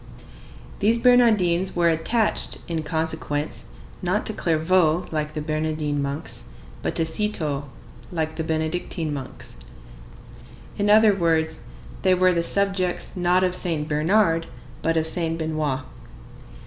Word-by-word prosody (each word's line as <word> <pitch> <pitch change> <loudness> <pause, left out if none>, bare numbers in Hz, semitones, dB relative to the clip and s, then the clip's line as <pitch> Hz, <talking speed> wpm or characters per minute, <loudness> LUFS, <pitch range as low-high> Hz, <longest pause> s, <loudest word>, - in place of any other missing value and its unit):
These 220 +3 +3
Bernardines 215 -8 +4
were 170 -1 +3
attached, 210 +8 0
in 165 -2 -2
consequence, 160 -1 -2 0.4
not - - 0
to - - -2
Clairvaux, 165 +1 +2
like 155 -1 -2
the 150 - -3
Bernardine 155 -1 -1
monks, 140 - -5 0.4
but - - -2
to 165 - +1
Cîteaux, 160 -5 -1 0.5
like 160 -2 -2
the 160 - -2
Benedictine 160 0 -2
monks. 130 - -7 1.2
In 205 0 0
other 215 0 +7
words, 160 -3 +1 0.4
they 185 -1 +4
were 185 0 +4
the 170 - +1
subjects, 195 0 0
not 180 0 +2
of 180 -1 +1
Saint 160 -5 -1
Bernard, 165 +2 +2 0.3
but 165 0 +1
of 160 - +1
Saint 165 -1 -1
Benoît. 155 -4 -1
165 Hz, 125 wpm, -23 LUFS, 155-185 Hz, 1.2 s, other